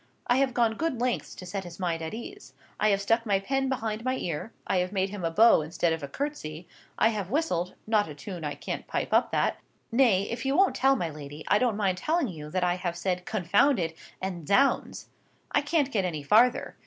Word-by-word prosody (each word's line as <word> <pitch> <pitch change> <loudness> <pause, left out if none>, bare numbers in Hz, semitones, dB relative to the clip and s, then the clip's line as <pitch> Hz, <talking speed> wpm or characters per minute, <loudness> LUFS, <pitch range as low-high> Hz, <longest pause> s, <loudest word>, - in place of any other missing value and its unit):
I 245 - +3
have 265 -2 +1
gone 230 -2 +2
good 320 -6 -1
lengths 250 0 -1
to 185 - -9
set 190 +2 -4
his 175 0 -10
mind 170 -3 -1
at 160 - -4
ease. 395 - -9 0.2
I 215 - +3
have 200 -1 +1
stuck 225 +3 +2
my 200 -4 +1
pen 270 +6 -1
behind 225 -4 -2
my 255 +1 0
ear, 170 +4 -4
I - - +1
have 180 0 0
made 195 -1 0
him 205 -3 -6
a 165 - +1
bow 215 +3 +6
instead 165 +2 0
of 160 - -4
a 140 - -5
curtsey, 175 - -5 0.3
I 220 - +4
have 205 -5 -3
whistled—not 215 - 0
a 150 - -8
tune 175 +2 -7
I 150 -1 -3
can't - - -5
pipe - - -2
up - - +4
that—nay, 230 -6 +1
if 230 +3 -4
you 270 +2 +1
won't 390 +1 +4
tell 270 +1 +3
my 175 -9 -2
lady, 150 0 -9
I 205 - +5
don't 240 -5 +1
mind 190 -3 0
telling 315 - 0
you 150 -4 -8
that 185 +3 -1
I 180 0 +1
have 175 -2 -3
said 180 0 -2
'Confound 215 - +3
it!' 165 -3 -2 0.2
and 180 -5 -5
'Zounds!' 270 +7 +2 0.5
I - - +3
can't 295 -2 +1
get 205 -6 +1
any 160 -5 -3
farther. 230 - +3
200 Hz, 225 wpm, -27 LUFS, 175-245 Hz, 0.5 s, bow